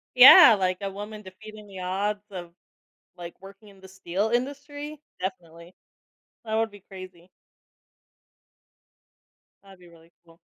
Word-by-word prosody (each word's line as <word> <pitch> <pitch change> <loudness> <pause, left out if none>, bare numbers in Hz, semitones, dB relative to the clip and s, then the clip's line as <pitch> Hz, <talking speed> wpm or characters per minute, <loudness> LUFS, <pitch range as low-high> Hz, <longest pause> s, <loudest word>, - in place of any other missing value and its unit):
Yeah. 255 0 +10
Like, 185 -1 0
a 195 -1 -4
woman 210 +2 -9
defeating 210 +2 -13
the 195 -2 -11
odds 200 +3 -3
of, 175 -3 -9 0.7
like, 175 -1 -11
working 195 +2 -15
in 195 -1 -19
the 190 - -14
steel 190 +2 -3
industry. 285 +4 -4 0.2
Definitely. 175 -2 -8 0.7
That 220 -1 -4
would 225 -1 0
be 205 - -15
crazy. 185 -2 -13 2.3
That'd 195 -2 -17
be 180 - -18
really 165 0 -21
cool. 165 0 -22
195 Hz, 130 wpm, -25 LUFS, 180-215 Hz, 2.3 s, Yeah